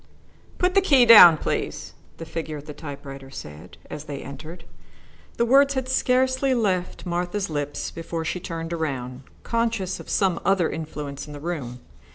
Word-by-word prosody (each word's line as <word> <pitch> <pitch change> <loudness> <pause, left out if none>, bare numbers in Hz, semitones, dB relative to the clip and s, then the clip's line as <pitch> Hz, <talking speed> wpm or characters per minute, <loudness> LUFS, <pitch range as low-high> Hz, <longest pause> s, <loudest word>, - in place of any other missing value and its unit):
"Put 360 0 +1
the 390 - +5
key 275 -10 +5
down, 195 -8 +10
please," - - -3 0.2
the 165 - -7
figure 160 -1 -5
at 145 - -10
the 150 - -8
typewriter 140 -2 -9
said, 75 - -10
as 150 - -8
they 140 -2 -6
entered. 155 +5 -9 0.7
The 235 - +2
words 275 +3 +4
had 260 -1 -2
scarcely 260 +1 +2
left 190 -7 -1
Martha's 175 +2 -2
lips 145 -1 -3
before 165 0 -5
she 180 - -2
turned 165 -2 -5
around, 135 -6 -4 0.2
conscious 230 -5 -1
of - - -11
some 190 -4 +1
other 190 -4 +2
influence 150 -3 -6
in 150 - -9
the 145 - -8
room. 140 -7 -5
165 Hz, 165 wpm, -24 LUFS, 145-230 Hz, 0.7 s, down